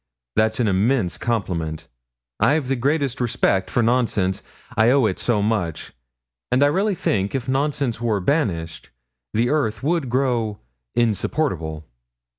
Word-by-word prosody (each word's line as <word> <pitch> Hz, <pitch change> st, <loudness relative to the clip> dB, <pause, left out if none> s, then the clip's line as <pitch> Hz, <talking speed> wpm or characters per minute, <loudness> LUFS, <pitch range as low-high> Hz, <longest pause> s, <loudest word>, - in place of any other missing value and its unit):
That's 110 Hz, +1 st, +2 dB
an 120 Hz, -, +2 dB
immense 100 Hz, -, +1 dB
compliment. 85 Hz, -8 st, -2 dB, 0.5 s
I've 145 Hz, -3 st, +2 dB
the 135 Hz, -, +2 dB
greatest 140 Hz, 0 st, 0 dB
respect 115 Hz, -5 st, +1 dB
for 120 Hz, -, +1 dB
nonsense, 110 Hz, -5 st, +1 dB, 0.3 s
I 110 Hz, 0 st, +4 dB
owe 135 Hz, -1 st, +4 dB
it 95 Hz, -4 st, -1 dB
so 110 Hz, -4 st, +1 dB
much; 100 Hz, -7 st, -1 dB, 0.6 s
and 130 Hz, +3 st, +4 dB
I -, -, +7 dB
really 195 Hz, +6 st, +1 dB
think 100 Hz, -, -1 dB
if 130 Hz, -1 st, -3 dB
nonsense 135 Hz, -3 st, 0 dB
were 110 Hz, -4 st, +1 dB
banished, 90 Hz, -, -1 dB, 0.5 s
the 120 Hz, +3 st, +2 dB
earth 115 Hz, -8 st, 0 dB
would 160 Hz, -3 st, 0 dB
grow 120 Hz, -5 st, 0 dB, 0.4 s
insupportable.' 95 Hz, -, -1 dB
115 Hz, 135 wpm, -22 LUFS, 100-135 Hz, 0.6 s, I